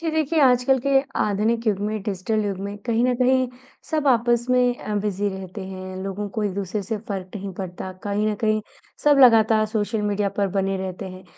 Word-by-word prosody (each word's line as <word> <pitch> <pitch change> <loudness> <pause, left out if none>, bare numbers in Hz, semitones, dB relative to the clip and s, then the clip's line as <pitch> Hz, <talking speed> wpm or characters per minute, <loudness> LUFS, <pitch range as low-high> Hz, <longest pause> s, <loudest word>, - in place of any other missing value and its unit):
जी। 330 -1 -1
देखिए 315 0 +1
आजकल 255 0 +4
के - - +2 0.3
आधुनिक 220 +3 0
युग 205 -3 +2
में 210 0 -2
डिजिटल 210 +2 -1
युग 200 -2 -2
में 200 +1 -5
कहीं 235 0 +2
न 250 0 +2
कहीं 255 +1 +3 0.4
सब 310 -2 0
आपस 240 -1 +3
में 250 - +4 0.2
अ, 210 - -4
बिज़ी 205 0 -1
रहते 190 0 -7
हैं। 185 0 -7
लोगों 195 +1 -4
को 215 - 0
एक-दूसरे 200 +1 -2
से 220 +2 -3
फ़र्क 190 -2 -4
नहीं 195 -1 -6
पड़ता। 185 0 -6
कहीं 205 +1 0
न 215 - +1
कहीं 215 -1 +2 0.4
सब 295 -1 +5
लगातार 220 -3 +6
सोशल 215 0 -1
मीडिया 205 0 0
पर 200 -1 +2
बने 195 0 0
रहते 190 0 -5
हैं। 185 +1 -11
210 Hz, 200 wpm, -23 LUFS, 195-235 Hz, 0.4 s, लगातार